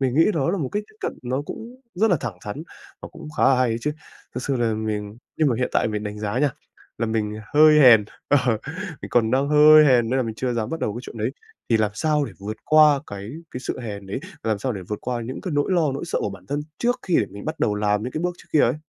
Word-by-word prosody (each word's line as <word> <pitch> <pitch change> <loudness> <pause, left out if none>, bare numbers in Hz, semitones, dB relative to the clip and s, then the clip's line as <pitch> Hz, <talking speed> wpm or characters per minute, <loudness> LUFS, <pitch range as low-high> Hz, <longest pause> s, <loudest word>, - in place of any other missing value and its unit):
Mình 130 -2 0
nghĩ 160 - +5
đó 160 -1 0
là 195 - -1
một 135 -5 -2
cách 210 +1 -1
tiếp 215 - -24
cận - - -2
nó 130 +3 -2
cũng 240 - -9
rất 215 +3 +2
là 175 - +4
thẳng 115 -7 -4
thắn 125 +9 -5 0.4
và - - -7
cũng 165 -2 -10
khá - - 0
là 135 - +5
hay 130 -2 +3
đấy 115 +1 -1
chứ, 150 - -1 0.4
thực 125 - -4
sự 135 -1 -1
là 115 -2 +1
mình 105 -1 -4 0.2
nhưng 155 -3 +3
mà 120 - +1
hiện 125 - 0
tại - - +2
mình 105 -1 -3
đánh 105 0 -5
giá 105 +3 -2
nha, 145 +1 +2 0.5
là 115 - 0
mình 110 -1 -2 0.2
hơi 155 0 +7
hèn 115 -6 +8 0.2
ờ, 145 - +5 0.6
mình - - -6
còn 115 -2 +2
đang 135 +2 +1
hơi 150 +1 +8
hèn 120 -4 +4
nên 130 - +1
là - - +2
mình 110 -2 -4
chưa 125 +1 -2
dám 115 -2 -2
bắt 165 - -4
đầu 105 - -1
cái 120 - -5
chuyện - - -9
đấy, - - 0 0.4
thì 115 - +5
làm 110 -1 +1
sao 150 +2 +1
để - - -7
vượt 105 +2 -6
qua 155 -2 +6
cái 100 +2 -7 0.2
cái 125 - -6
sự - - -4
hèn 100 -4 -6
đấy, 100 +7 -4 0.2
làm 110 -2 0
sao 125 +4 -2
để 95 -3 -6
vượt 105 - -3
qua 120 -2 -2
những 130 +3 -6
cái 180 - -4
nỗi 145 +6 +1
lo, 160 -6 +2
nỗi 140 - -4
sợ - - -1
của 100 - -2
bản 95 -1 -12
thân 145 +1 -1 0.2
trước 245 +1 0
khi 180 - +1
để 105 - +1
mình 100 +1 -9
bắt 155 +1 -4
đầu 105 - +2
làm 105 0 0
những 125 - -5
cái 155 - -3
bước 180 0 -1
trước - - -17
kia 150 - +5
ấy? 150 - +2
125 Hz, 290 wpm, -23 LUFS, 110-150 Hz, 0.6 s, hèn